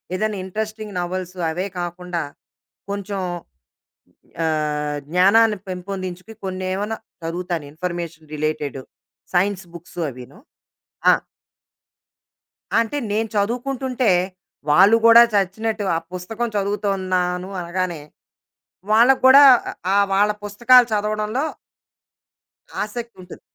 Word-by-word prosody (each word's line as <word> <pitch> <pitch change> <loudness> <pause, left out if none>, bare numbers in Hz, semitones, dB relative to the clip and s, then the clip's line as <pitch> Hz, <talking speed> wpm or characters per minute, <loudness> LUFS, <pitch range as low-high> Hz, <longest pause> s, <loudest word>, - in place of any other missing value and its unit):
ఏదైనా 215 +1 -1
interesting 215 +1 -5
novels 180 +1 -4 0.2
అవే 180 +4 -3
కాకుండా, 175 0 -4 0.7
కొంచెం 200 0 -4 1.2
ఆహ్, 150 -2 -1
జ్ఞానాన్ని 205 +5 +4
పెంపొందించుకు 185 +1 -6
కొన్నేమన్నా 190 +3 -3 0.3
చదువుతాను 170 -1 -3
ఇన్ఫర్మేషన్ 170 -2 -6
రిలేటెడు 150 -3 -3 0.5
సైన్స్ 195 +1 +1
బుక్స్ 170 +1 -12
అవీను. 125 - -11 0.7
ఆ! - - +6 1.7
అంటే 230 +5 -1
నేను 220 +2 0
చదువుకుంటుంటే, 250 +3 0 0.6
వాళ్ళు 195 +9 +6
గూడా 230 0 +9
చచ్చినట్టు 210 +2 0
ఆ - - +2 0.2
పుస్తకం 220 +6 -3
చదువుతున్నాను 190 -3 -1
అనగానే, 175 -2 -3 0.9
వాళ్ళకి 240 +5 +5
గూడా 270 +2 +9 0.5
ఆహ్, 200 0 +4
వాళ్ళ 205 +2 +3
పుస్తకాలు 240 +5 +5
చదవడంలో... 215 +5 -1 1.4
ఆశక్తుంటుంది. 210 -4 -7
195 Hz, 85 wpm, -21 LUFS, 175-215 Hz, 1.7 s, గూడా